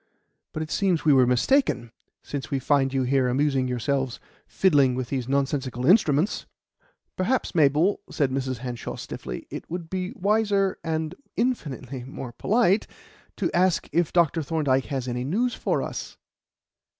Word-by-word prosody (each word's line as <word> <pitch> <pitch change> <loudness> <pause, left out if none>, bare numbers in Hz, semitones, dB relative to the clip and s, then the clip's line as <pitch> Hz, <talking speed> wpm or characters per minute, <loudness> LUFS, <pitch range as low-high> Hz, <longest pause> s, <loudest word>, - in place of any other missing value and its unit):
But 155 - -3
it 155 - -9
seems 185 -5 +1
we 150 - +6
were 130 -2 +5
mistaken, 125 - +2 0.3
since 140 -2 -5
we 140 - 0
find 135 0 +2
you 135 -1 0
here 130 0 +2
amusing 135 0 +1
yourselves 125 0 -1 0.3
fiddling 140 -9 +3
with 130 -1 -3
these 130 -3 -2
nonsensical 135 -2 -1
instruments." 170 -1 +3 0.7
"Perhaps, 240 +8 0
Mabel," 155 +4 +3
said 140 -4 0
Mrs. 130 -1 -2
Hanshaw 120 -1 -5
stiffly, - - -7
"it - - -7
would 170 -1 -6
be 185 -1 -2
wiser, 200 -1 +1
and 160 0 -2 0.2
infinitely 140 - -2
more 130 -1 -7
polite, 210 - +2 0.5
to - - -1
ask 180 -1 +2
if 170 -1 +1
Dr. 170 -2 +3
Thorndyke 140 -4 +1
has 135 -3 -3
any 125 0 -2
news 230 - 0
for - - -1
us." - - -6
145 Hz, 150 wpm, -25 LUFS, 130-180 Hz, 0.7 s, we